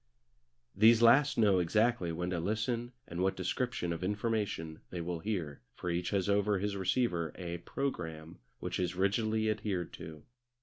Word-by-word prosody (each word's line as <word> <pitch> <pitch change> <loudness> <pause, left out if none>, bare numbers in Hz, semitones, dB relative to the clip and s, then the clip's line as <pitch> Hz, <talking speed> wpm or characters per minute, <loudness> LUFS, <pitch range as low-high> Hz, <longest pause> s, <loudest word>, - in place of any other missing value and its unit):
These 115 +3 +6
last 135 +5 +6
know 100 -5 +4
exactly 100 +1 +2
when 90 +2 -3
to 90 - -1
listen 110 +6 -1 0.2
and 85 +1 -4
what 95 +1 +2
description 95 -1 -2
of 85 - -5
information 105 -6 -2
they 90 - -5
will 85 0 -3
hear, 85 -7 -3
for 90 - -3
each 85 +1 -1
has 100 -2 0
over 100 0 +2
his 100 +1 -2
receiver 95 -4 0
a 85 -2 -5
programme 80 - -4 0.2
which - - -3
is 90 0 -1
rigidly 110 +3 +1
adhered 100 -5 -2
to. 80 -2 -9
95 Hz, 160 wpm, -32 LUFS, 85-110 Hz, 0.2 s, These